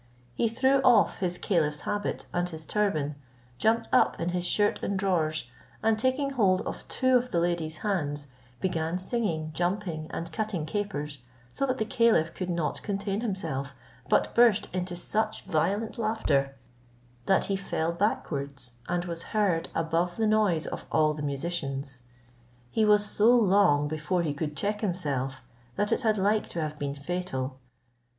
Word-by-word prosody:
He 225 - +1
threw 265 +4 +3
off 240 -6 +5
his 180 -2 -1
caliph's 150 -7 0
habit, 205 0 -2
and 175 0 0
his 160 -2 -7
turban, 155 -9 0 0.4
jumped 230 +1 +2
up - - +4
in 170 - -1
his 180 0 -1
shirt 205 +2 +2
and 200 - -1
drawers, 160 -8 0 0.4
and 220 0 +4
taking 260 +3 +1
hold 195 -8 +3
of - - -6
two 260 -1 +2
of 250 +1 -2
the 170 - +1
ladies' 170 -2 -1
hands, 145 -8 0 0.3
began 165 -2 -1
singing, 185 -6 -1
jumping 175 -3 -2
and 165 0 -5
cutting 185 -3 -2
capers, 155 -7 -3 0.3
so 275 - 0
that 255 0 0
the 220 - 0
caliph 225 -9 +3
could 185 -1 -4
not 170 -3 -1
contain 200 0 -2
himself, 155 - -3 0.3
but - - +2
burst 235 -4 +5
into 180 -1 -2
such 215 +5 -1
violent 195 +7 0
laughter, 145 -12 +1 0.7
that 190 - +4
he 195 - 0
fell 170 -4 -1
backwards, 140 - -2
and 175 0 0
was 170 -1 -4 0.2
heard 185 -6 +2
above 165 +2 0
the 225 - +1
noise 210 -7 +2
of - - -6
all 155 -1 +3
the 150 - -6
musicians. 140 -3 -3 0.7
He 220 - +2
was 210 0 +5
so 210 +2 +3
long 195 -9 +4
before 155 +4 -1
he 150 -3 -1
could 150 +1 -4
check 205 +1 -1
himself, 140 - -2 0.3
that 205 - 0
it - - +2
had 220 -3 +2
like 205 +2 +1
to 170 - -4
have 155 -1 -3
been 140 -1 -2
fatal. 140 -4 -3
180 Hz, 160 wpm, -28 LUFS, 155-210 Hz, 0.7 s, off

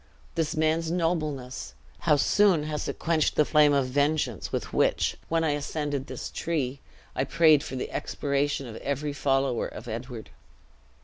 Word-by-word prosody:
This 165 -2 -1
man's 160 +1 +1
nobleness, 155 - -2 0.2
how 150 - +3
soon 185 +2 +3
has 150 -1 -3
it - - -4
quenched 160 -2 +1
the 150 - +4
flame 150 -1 +5
of 140 -2 +3
vengeance 140 - 0
with - - -3
which, - - +2
when 165 0 +1
I 160 - +2
ascended 145 -1 -2
this - - -6
tree, 140 -5 -2 0.4
I - - +1
prayed 155 -3 +5
for 130 - -6
the 125 - -4
extirpation 140 0 -1
of 115 -3 -8
every 140 +1 -2
follower 135 -3 +1
of 115 - -10
Edward!" 115 0 -6
145 Hz, 160 wpm, -27 LUFS, 135-155 Hz, 0.4 s, flame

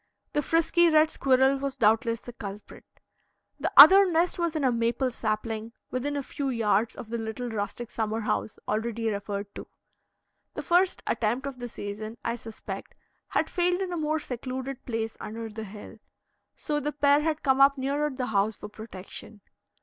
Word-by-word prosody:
The 295 - +2
frisky 330 +3 +3
red 310 0 +4
squirrel 265 +1 +3
was 275 0 -3
doubtless 230 -1 +2
the 245 - -10
culprit. 205 -2 -9 0.7
The - - -1
other 380 +7 +10
nest 340 +2 +1
was 340 -2 0
in 305 - -1
a 260 - +3
maple 235 +2 0
sapling, 220 0 -3 0.2
within 285 +3 -2
a 280 - -2
few 280 0 -3
yards 225 -2 +1
of 235 -4 -9
the 235 0 -3
little 225 +2 -4
rustic 220 +3 -4
summer 220 0 -2
house 215 0 -2
already 225 +1 -1
referred 200 0 -4
to. - - -8 0.9
The - - -4
first 360 +1 +2
attempt 235 +4 0
of 275 -2 -6
the 245 - -4
season, 215 +1 -7
I 235 - 0
suspect, 225 -2 -8 0.3
had - - 0
failed 355 0 +1
in 375 -2 -3
a - - -1
more 310 0 0
secluded 260 0 -5
place 225 -2 -2
under 225 +1 -6
the 220 +1 -7
hill; 210 +2 -11 0.6
so 295 -1 -2
the 295 0 -3
pair 285 0 +4
had 310 0 -1
come 265 -1 +3
up 275 +1 +6
nearer 285 +3 0
the 260 -2 -3
house 210 -1 +1
for - - -8
protection. 210 0 -10
245 Hz, 175 wpm, -27 LUFS, 220-290 Hz, 0.9 s, other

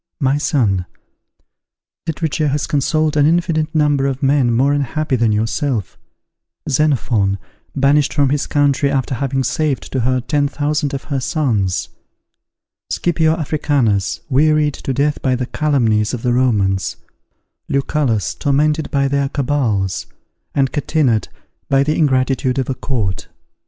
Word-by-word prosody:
My 140 -1 +1
son, 100 - 0 1.2
literature 160 -1 -1
has 145 +1 0
consoled 150 +2 0
an 145 -1 +4
infinite 165 -1 0
number 145 -3 +2
of 135 +1 -3
men 135 -3 +3
more 135 +5 +2
unhappy 145 0 -1
than 115 -3 +2
yourself: 110 - -1 0.7
Xenophon, 125 -9 +1 0.4
banished 140 +1 +3
from 140 -3 +2
his 145 0 0
country 145 -1 +2
after 135 0 -1
having 135 +1 -1
saved 145 +2 -1
to 130 - -1
her 130 +2 +1
ten 145 +3 0
thousand 145 0 -1
of 135 - -5
her 135 - +1
sons; 120 - -1 1.0
Scipio 160 -2 +1
Africanus, 140 - 0
wearied 150 +1 +3
to 135 - -5
death 145 +3 0
by 130 -2 +1
the 125 0 -2
calumnies 120 -7 +1
of 115 - -8
the 120 -1 +1
Romans; 100 -7 +1 0.7
Lucullus, 135 -6 0
tormented 150 +2 0
by 140 -1 +1
their 140 0 0
cabals; 120 -10 -1 0.5
and 135 -2 +2
Catinat, 145 - +1 0.4
by 135 0 +4
the 155 +2 0
ingratitude 130 -3 +1
of 135 0 -1
a - - 0
court. 110 -9 -3
140 Hz, 135 wpm, -18 LUFS, 125-150 Hz, 1.2 s, an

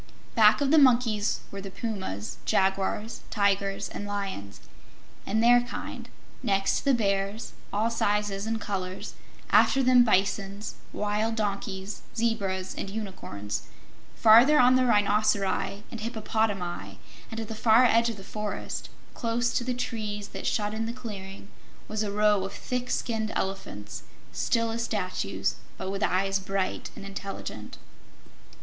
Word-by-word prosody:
Back 215 0 +6
of 280 -1 +2
the 315 - +7
monkeys 235 -6 +3
were 195 - -6
the 195 - -7
pumas, 190 - -4
jaguars, 195 +3 0
tigers 200 -1 +1
and 205 - -6
lions, 195 - -4 0.7
and 220 +2 +1
their 245 +1 +7
kind; 245 - -7 0.3
next 195 -4 +1
the 275 - +4
bears, 200 0 -1 0.2
all 220 +3 +1
sizes 205 -2 0
and 225 0 -1
colors; 190 -3 -4 0.4
after 270 - +5
them 250 -1 +7
bisons, 200 -1 0 0.2
wild 215 +2 -1
asses, 200 -1 -3
zebras 200 -5 -1
and 195 - -5
unicorns; 190 - -5 0.5
farther 235 +7 +7
on 250 0 +6
the 255 -1 +3
rhinoceri 205 -2 +2
and 230 - -6
hippopotami, 210 - -2 0.3
and 225 - -5
at 225 - -4
the 225 - -5
far 220 +3 +5
edge 230 -1 +4
of 225 - -5
the 195 - -10
forest, 210 0 -5 0.2
close 235 0 0
to 250 - +1
the 250 0 -2
trees 215 -4 -3
that - - -5
shut 210 -1 0
in 225 +1 -2
the 230 - -3
clearing, 200 -6 -8 0.4
was 215 0 -2
a 210 -2 -1
row 210 -1 +3
of 195 - -5
thick 250 0 -3
skinned 220 -2 -1
elephants, 190 - -4 0.3
still 230 -1 +1
as 230 +1 -2
statues 190 -5 -2 0.2
but 190 0 -4
with 195 +1 -4
eyes 195 +1 +1
bright 195 0 -2
and - - -9
intelligent. 195 0 -7
210 Hz, 145 wpm, -27 LUFS, 195-230 Hz, 0.7 s, the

